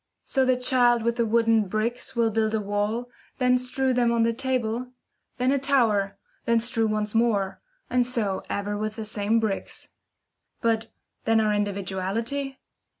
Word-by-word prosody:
So 265 -1 +1
the 255 -1 +3
child 245 -2 +3
with 235 +1 0
the 235 - +3
same - - -4
wooden 225 -2 +3
bricks 220 +6 -2
will 230 -1 +2
build 220 0 +1
a - - +1
wall, 210 +4 -2 0.3
then 250 -1 +3
strew 255 +1 0
them 245 -1 +2
on 230 -1 +2
the 230 0 +2
table; 250 0 -2 0.4
then 255 +1 +2
a 280 - +2
tower, 220 -8 +2 0.3
then 230 0 +3
strew 230 -1 0
once 215 -1 -1
more, 220 -4 +1 0.3
and 250 0 +2
so 230 -6 -1
ever 205 +1 -2
with 215 +1 -3
the 220 -1 -5
same 215 +1 +2
bricks. 215 -3 -3 0.7
But 225 -1 +1 0.4
then 225 0 +4
our 215 -1 +2
individuality? 205 +7 -2
230 Hz, 165 wpm, -25 LUFS, 210-245 Hz, 0.7 s, then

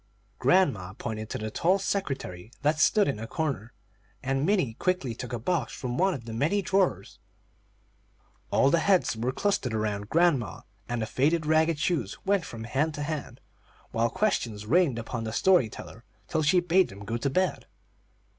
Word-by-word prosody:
Grandma 125 - +2
pointed 110 0 -5
to - - -3
the 110 0 -4
tall 180 - +2
secretary 135 - -3
that 150 +1 +2
stood 210 -2 +4
in 135 -6 -1
a 115 - -5
corner, 135 -6 -3 0.5
and 135 +3 0
Minnie 185 - +2
quickly 175 -4 -1
took 120 +2 -7
a 120 - -2
box 170 +9 -1
from 125 -2 -4
one 190 +4 +2
of 120 -4 -9
the 115 - -6
many 160 - +1
drawers. 190 +1 0 1.3
All 135 - +3
the 170 - +4
heads 185 - +2 0.2
clustered 140 - 0
around 105 -1 -2
grandma, 165 - +2 0.3
and 120 -2 -1
the - - -1
faded, 155 +8 +1
ragged 160 +1 +3
shoes 170 +2 -1
went 195 -2 +2
from 115 -1 -7
hand 145 +7 -1
to 145 - -3
hand, 145 -5 -5 0.5
while 115 +1 +1
questions 115 - -1
rained 150 0 +3
upon 115 0 -4
the 110 - -4
story 175 -2 +4
teller 115 +2 -10 0.2
till 160 - 0
she 155 +4 +4
bade 180 +1 +3
them 100 +1 -10
go 115 +2 -2
to 140 +4 -1
bed. 185 +7 0
140 Hz, 175 wpm, -27 LUFS, 115-175 Hz, 1.3 s, stood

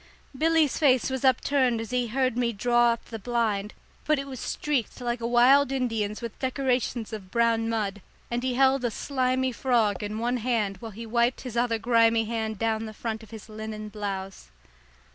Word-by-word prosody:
Billy's 320 0 +2
face 260 -4 +3
was 265 0 -3
upturned 260 -2 +2
as 225 +1 -6
he 250 -1 0
heard 255 +1 0
me 240 -1 +1
draw 240 +2 +3
up 230 - -4
the 225 - -7
blind, 215 -2 -1 0.3
but 305 0 +2
it 275 - -3
was 265 -3 -8
streaked 270 -4 -2
like 240 -1 -2
a 230 - -1
wild 255 +3 +5
Indian's 225 -5 -2
with 230 -2 -6
decorations 255 -3 -1
of 195 -4 -7
brown 230 +1 +1
mud, 205 -3 -2 0.3
and 240 0 -1
he 255 -1 -1
held 270 0 +3
a 240 - +1
slimy 260 +1 0
frog 230 -6 +1
in 210 +1 -4
one 240 +2 0
hand 220 -5 -1
while 225 +4 -8
he 230 +3 -8
wiped 235 +2 +1
his 250 -3 -7
other 235 -1 +1
grimy 230 0 +3
hand 220 -1 -3
down 225 +1 -1
the 215 - -9
front 220 0 -4
of 220 - -14
his 220 -1 -10
linen 215 -1 -6
blouse. 195 - -5
235 Hz, 190 wpm, -26 LUFS, 220-255 Hz, 0.3 s, wild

